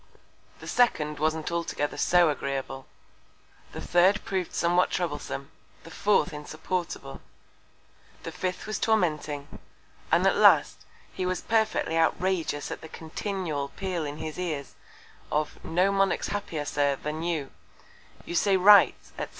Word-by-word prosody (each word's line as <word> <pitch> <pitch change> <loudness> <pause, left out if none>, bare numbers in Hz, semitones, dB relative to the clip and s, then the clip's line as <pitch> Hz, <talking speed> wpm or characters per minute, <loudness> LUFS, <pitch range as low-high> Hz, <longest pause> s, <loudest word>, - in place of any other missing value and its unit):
The - - -9
second 150 -12 +1
wasn't 155 +1 -1
altogether 170 -3 -2
so 175 -2 +4
agreeable; 135 -1 -4 0.8
The - - -7
third 185 +4 +3
prov'd 185 -3 -2
somewhat 175 +1 +2
troublesome; 145 -5 -4 0.3
the 165 - -12
fourth 190 -1 +1
insupportable; 155 - -5 1.0
the 165 - -5
fifth 180 +2 -4
was 215 -1 -3
tormenting; 155 -9 -1 0.5
and - - +4
at - - +4
last, - - +5 0.3
he - - -3
was 185 0 -1
perfectly 220 -7 +1
outrageous 165 -2 0
at - - -6
the 160 - -10
continual 160 -3 -4
Peal 185 -4 -3
in 145 0 -5
his 155 +2 -6
Ears 155 -6 -4 0.6
of 150 0 -2
No 180 +4 +2
Monarch's 195 0 +1
happier 170 -7 -3
Sir, 145 -1 +1
than 150 +3 -5
you, 165 -5 -2 0.7
You - - -6
say 195 +2 +3
right, 200 +2 +7 0.2
_&c. - - -4
165 Hz, 135 wpm, -27 LUFS, 150-185 Hz, 1.0 s, right